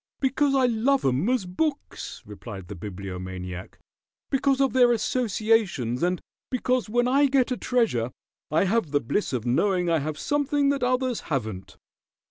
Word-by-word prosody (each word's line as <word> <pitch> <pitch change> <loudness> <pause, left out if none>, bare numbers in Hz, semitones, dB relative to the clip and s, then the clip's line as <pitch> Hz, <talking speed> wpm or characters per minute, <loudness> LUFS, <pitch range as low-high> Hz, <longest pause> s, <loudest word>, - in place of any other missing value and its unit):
"Because 275 +1 +2
I 265 -1 +4
love 250 +4 +2
'em 135 - +2
as 255 -7 +1
books," 280 - -3
replied 100 -2 -9
the 100 - -6
Bibliomaniac. 90 -1 -7 0.5
"Because 270 0 +2
of 270 -1 +2
their 250 -2 +5
associations, 215 - +1
and 180 +1 +1 0.3
because 255 -4 0
when 245 +2 +2
I 280 +3 +4
get 265 -2 +2
a - - +1
treasure 225 - 0 0.4
I 155 +4 +3
have 200 -3 +1
the 145 0 +2
bliss 145 - -1
of 125 -3 -2
knowing 180 +7 +2
I 165 - +3
have 150 +1 -4
something 290 - +1
that 280 -1 0
others 250 -1 +1
haven't." 110 - -3
215 Hz, 155 wpm, -26 LUFS, -, 0.5 s, their